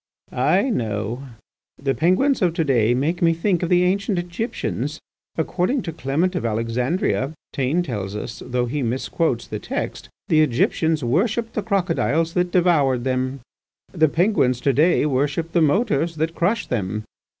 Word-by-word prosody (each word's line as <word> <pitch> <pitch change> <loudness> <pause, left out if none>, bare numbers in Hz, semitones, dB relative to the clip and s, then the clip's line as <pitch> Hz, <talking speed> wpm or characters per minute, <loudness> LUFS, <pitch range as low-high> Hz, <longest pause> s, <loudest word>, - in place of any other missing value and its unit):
"I 265 - +2
know. 110 - -2 0.5
The 135 0 -1
Penguins 195 - +2
of 175 -3 +2
to 165 - +1
day 120 -5 +2
make 155 +7 -1
me 165 -1 +4
think 175 +1 0
of 175 - -1
the 180 0 +4
ancient 195 +2 +1
Egyptians. 175 +7 -3 0.4
According 220 +8 0
to 165 - -4
Clement 160 +5 0
of 180 - -2
Alexandria, 125 - -1 0.2
Taine 140 +7 +1
tells 105 - -4
us—though 120 +3 -3
he 140 +4 -2
misquotes 125 +1 -1
the - - -5
text—the 155 -1 -2
Egyptians 155 +3 +1
worshipped 215 - 0
the 215 - -1
crocodiles 170 -5 0
that 180 0 +1
devoured 150 -9 +3
them. 130 +1 -1 0.5
The 160 -4 +3
Penguins 160 - +2
to 140 +1 +2
day 155 +3 +3
worship 145 +4 0
the 170 - +2
motors 165 - +1
that 160 +1 -1
crush 205 +7 0
them. 105 -2 -2
160 Hz, 150 wpm, -22 LUFS, 130-180 Hz, 0.5 s, me